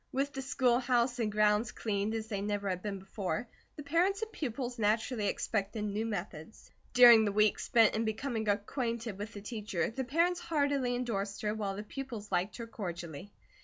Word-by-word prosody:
With 275 +2 -1
the 270 - -4
schoolhouse 245 -2 +2
and 220 -2 0
grounds 210 +1 +3
cleaned 210 0 -2
as 220 -1 -3
they 200 -3 -3
never 205 0 -2
had 180 -1 -1
been 205 -1 -3
before, 190 +1 -4 0.3
the 295 - -7
parents 360 +8 +1
and 440 - -5
pupils 245 -3 -4
naturally 215 +1 +1
expected 210 +1 -1
new 210 +2 -2
methods. 185 -2 -6 0.2
During 240 -3 +9
the 205 - +1
week 210 +1 +3
spent 230 -3 +4
in 220 - 0
becoming 220 0 -2
acquainted 225 0 -2
with 210 +2 -5
the 205 - -8
teacher, 205 -5 -2
the 265 +3 -3
parents 335 +7 +1
heartily 285 -7 0
endorsed 205 -5 -3
her, 210 0 0
while 205 -3 -3
the 205 - -5
pupils 230 -3 -7
liked 185 +4 0
her 235 - -5
cordially. 175 -5 -6
220 Hz, 180 wpm, -32 LUFS, 205-250 Hz, 0.3 s, During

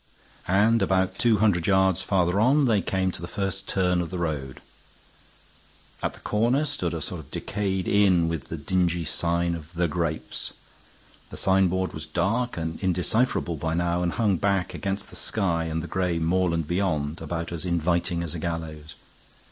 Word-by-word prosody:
And 105 +5 +4
about 95 0 +1
two 115 -3 +4
hundred 100 -5 +2
yards 95 -2 +3
farther 95 -1 +1
on 135 +6 +4
they 110 -5 +3
came 95 0 0
to 85 - -6
the 85 - -5
first 95 +1 -3
turn 90 -2 +2
of 85 - -4
the 90 - -4
road. 75 -6 -3 1.4
At - - -2
the - - -14
corner 120 +8 +1
stood 85 - -2
a 80 - -4
sort 90 +3 -4
of 75 - -12
decayed 95 -3 -2
inn 95 -5 +4
with 85 -1 -3
the 85 - -5
dingy 85 +2 0
sign 85 +5 0
of 80 -1 -7
The 85 0 +2
Grapes. 80 0 -3 0.8
The - - -8
signboard 95 -1 +2
was - - -6
dark 120 +4 0
and 80 0 -3
indecipherable 95 0 0
by 80 +2 -1
now, 85 0 +1
and 85 -1 0
hung 105 -5 +2
black 100 0 0
against 100 +1 -4
the - - -11
sky 85 -6 0
and 80 0 -2
the - - -5
gray 90 -2 0
moorland 85 -1 +1
beyond, 85 -4 -1
about 85 -1 -4
as 85 -1 -3
inviting 85 0 0
as 85 - -3
a 85 - -4
gallows. 80 -2 -5
90 Hz, 175 wpm, -26 LUFS, 85-95 Hz, 1.4 s, And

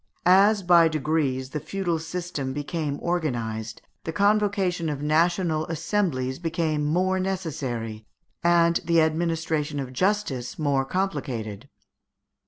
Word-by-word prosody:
As, 195 +3 +5
by 175 -2 +6
degrees, 145 -4 -1
the 150 - -2
feudal 175 0 -2
System 160 -5 -4
became 145 0 -3
organized, 115 -10 -2 0.2
the 160 - -3
convocation 200 -3 +1
of 145 -1 -4
national 160 +1 +1
assemblies 160 -6 -1
became 160 -3 -1
more 185 +5 +1
necessary, 130 - -3 0.4
and 170 -1 +4
the 170 0 +3
administration 160 -2 0
of 130 -2 -5
justice 165 - -1
more 140 -3 +1
complicated. 135 - -3
160 Hz, 110 wpm, -25 LUFS, 135-180 Hz, 0.4 s, by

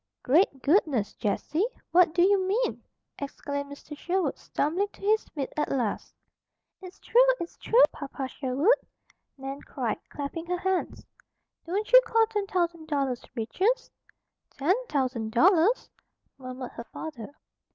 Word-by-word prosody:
"Great 280 -1 +3
goodness, 285 - +2
Jessie! 305 - -1 0.2
What 345 -2 +5
do 350 - +5
you 390 0 +4
mean? 460 +6 0 0.4
Exclaimed 285 0 -5
Mr. 290 +1 -9
Sherwood, 350 -1 -1
stumbling 350 +8 -1
to - - -18
his 430 +2 +2
feet 280 -4 -5
at 300 - 0
last. 240 -6 -2 0.7
"It's 370 0 -11
true! 485 - +3 0.2
It's 340 - -6
true, 480 +2 +4
Papa 275 -2 -5
Sherwood!" 275 - +2 0.6
Nan 270 +1 -6
cried, 245 -6 -3
clapping 310 +4 -5
her 360 0 0
hands. 375 0 -2 0.6
"Don't 415 +7 -2
you - - +11
call 455 -1 +3
ten 415 -2 -3
thousand 340 -4 -1
dollars 275 -5 -1
riches?" 370 - 0 0.6
"Ten, 300 +7 +1 0.2
thousand, 255 -6 -1
dollars?" 365 - +4 0.5
murmured 255 -1 -7
her 235 - -8
father. 285 +1 -8
315 Hz, 135 wpm, -27 LUFS, 270-380 Hz, 0.7 s, you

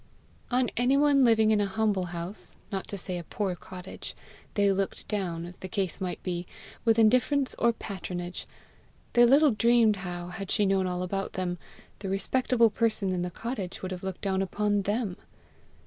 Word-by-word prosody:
On 250 0 +1
anyone 275 +3 +4
living 220 -2 +5
in 210 -1 +3
a 200 - +1
humble 200 -2 0
house, 175 +3 -5 0.2
not 195 -2 -3
to 200 - -5
say 180 -1 -3
a - - -7
poor 190 +2 -2
cottage, 180 +4 -9 0.4
they 200 -1 +4
looked 195 0 -2
down, 175 -5 -2
as 175 +1 -9
the 185 - -7
case 190 -1 -2
might 185 -1 -3
be, 175 -1 -3 0.4
with 225 -1 +4
indifference 255 +5 +3
or 235 - +4
patronage; 180 -5 -6 0.7
they 240 0 +7
little 280 +4 +6
dreamed 230 -1 +4
how, 175 -1 -5
had 185 +2 -6
she 210 - +2
known 190 -1 +2
all 180 0 -2
about 195 +1 -3
them, 180 -1 -2 0.4
the 195 -1 -4
respectable 230 +3 +2
person 215 -4 0
in 180 -1 -1
the 180 - -2
cottage 200 -2 -5
would 185 - -3
have 180 -1 -5
looked 190 -1 -5
down 190 -1 0
upon 205 +1 +1
THEM! 205 -1 -1
195 Hz, 180 wpm, -28 LUFS, 180-225 Hz, 0.7 s, they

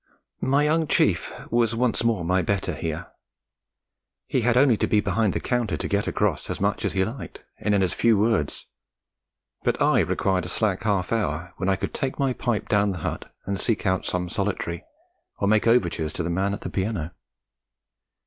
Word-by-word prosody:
My 140 +2 +3
young 160 +1 +2
chief - - +2 0.2
was 115 -1 +2
once 120 0 +1
more 110 -7 +1
my 95 +2 +2
better 95 0 -1
here; 80 +2 -5 1.1
he 130 - 0
had 120 +1 +2
only 130 -2 +5
to - - 0
be 105 - +3
behind 105 0 +1
the - - -1
counter 120 -2 -1
to - - -3
'get 100 0 0
across' - - 0
as - - -3
much - - 0
as - - -1
he 95 -1 +2
liked, 115 +5 -8
and 105 0 +1
in 95 - +3
as 90 - 0
few 115 -2 +3
words. 105 -8 0 1.0
But - - 0
I - - +4
required 95 -2 +1
a - - -4
slack 100 -1 0
half 100 -4 0
hour 85 -6 -1
when 95 - -1
I 95 - +3
could 95 - -4
take 135 -2 -2
my 135 -2 +1
pipe 120 -3 -2
down 100 -1 +2
the - - -6
hut - - -4
and 100 0 -2
seek 115 -2 0
out 95 -1 +1
some 90 -1 -1
solitary, 90 -2 -2 0.5
or 100 - 0
make 110 +2 +3
overtures 85 -9 +2
to 85 - -2
the 85 - -2
man 100 +3 0
at - - -10
the - - -5
piano. 95 -5 -2
100 Hz, 195 wpm, -25 LUFS, 90-115 Hz, 1.1 s, only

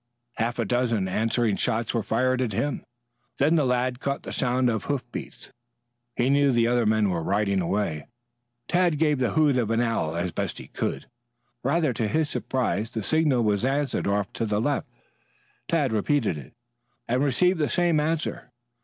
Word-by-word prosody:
Half 115 +2 -1
a 115 - 0
dozen 115 -3 0
answering 110 +2 +1
shots 115 +1 -1
were 115 - +1
fired 130 +4 +1
at 120 -5 -1
him, 145 +8 -2 0.5
then 150 +4 +3
the 150 -4 +3
lad 125 0 0
caught 140 +1 -3
the - - -6
sound 125 0 +1
of 110 -3 -1
hoofbeats. 130 -4 -5 0.6
He 125 +2 +2
knew 140 0 +4
the 120 -2 +3
other 120 -1 +2
man 110 -2 +2
was 85 -2 -2
riding 100 +1 +1
away. 85 -5 -2 0.6
Tad 175 -3 +2
gave 150 -2 +2
the 125 - 0
hoot 150 -5 +3
of 115 -3 -1
an 115 0 +1
owl 115 -9 0
as 85 +1 -2
best - - -3
he - - -7
could. - - -3 0.6
Rather 150 +1 +1
to 110 -1 -1
his 155 +7 0
surprise 115 -4 -1
the 110 -3 -4
signal 150 -3 +2
was 105 0 +1
answered 135 -2 0
off 100 -1 -1
to 115 - -2
the 105 0 0
left. 145 +5 -1 0.8
Tad 150 -7 +1
repeated 110 - +1
it 70 -4 -10 0.5
and 125 +3 +1
received 180 +6 +2
the 150 - +1
same 175 -3 +2
answer. 155 -4 -2
120 Hz, 180 wpm, -25 LUFS, 110-145 Hz, 0.8 s, knew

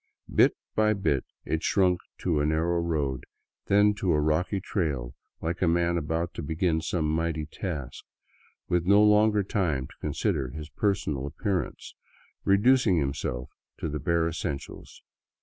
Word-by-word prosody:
Bit - - +4 0.2
by 110 0 +3
bit 85 -10 0 0.2
it 80 - -1
shrunk 90 -3 +2 0.2
to 85 -5 +1
a 75 - +1
narrow 80 +2 +1
road, 75 -6 -1 0.4
then 105 +1 +5
to 90 -4 +2
a 75 - +3
rocky 80 +6 +1
trail, 70 - -2 0.3
like 85 +2 -2
a 90 - +3
man 85 +1 +2
about 85 +1 -2
to - - -5
begin 80 +1 0
some 80 0 -1
mighty 80 0 -1
task, 75 - -6 0.6
with 90 0 0
no 100 +2 +6
longer 105 0 +4
time 85 -10 -1
to - - -14
consider 65 - -1
his 75 +4 -8
personal 75 -9 -1
appearance, 95 +4 -3 0.5
reducing 105 0 +4
himself 70 -4 -2 0.3
to - - -3
the 75 +1 -3
bare 85 +3 +1
essentials. 75 -4 -6
85 Hz, 150 wpm, -27 LUFS, 75-95 Hz, 0.6 s, no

